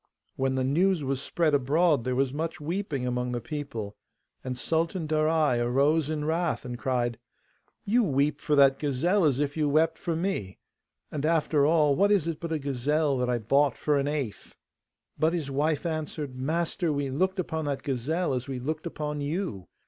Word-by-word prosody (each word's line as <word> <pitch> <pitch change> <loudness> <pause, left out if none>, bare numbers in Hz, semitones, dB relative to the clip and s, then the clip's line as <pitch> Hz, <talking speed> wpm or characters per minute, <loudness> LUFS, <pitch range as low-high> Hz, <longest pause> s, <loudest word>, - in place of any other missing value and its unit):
When 135 0 0
the 130 - 0
news 145 -2 +1
spread 160 0 0
abroad, 145 0 +2
there 130 0 0
was 135 0 +1
much 160 +2 -3
weeping 155 -4 -3
among 125 0 -1
the 120 - -1
people, 140 -9 -5 0.5
and 125 -1 -4
Sultan 165 +4 -1
Darai 155 -4 +2
arose 140 +5 +2
in 150 -1 -2
wrath, 165 -1 -1
and 125 0 -4
cried, 120 -2 -1 0.7
'You 235 +5 +3
weep 145 -4 +1
for 150 -1 +1
that 135 -1 +5
gazelle 160 +7 +1
as 140 -4 +3
if 145 -1 -1
you 150 -2 +1
wept 160 +2 +2
for 170 - -2
me! 165 - -2 0.5
And, 145 -2 -3
after 155 -2 +2
all, 150 -3 +4
what 200 +5 +3
is 190 -6 +3
it 165 -2 -3
but 170 - -5
a 160 - +1
gazelle, 145 +2 0
that 125 0 0
I 125 - +2
bought 135 +4 +2
for 150 -2 +1
an 140 - -1
eighth?' 145 -8 -4 0.6
But 160 +2 +3
his 155 -6 -2
wife 150 +3 0
answered, 155 -4 -3
'Master, 165 +5 -1
we 140 -2 -1
looked 185 +8 0
upon 160 -3 -2
that 140 -2 -2
gazelle 140 +5 -1
as 125 0 -3
we 135 -2 -4
looked 155 +6 -3
upon 150 -2 -4
you. 145 - -3
150 Hz, 185 wpm, -27 LUFS, 135-160 Hz, 0.7 s, that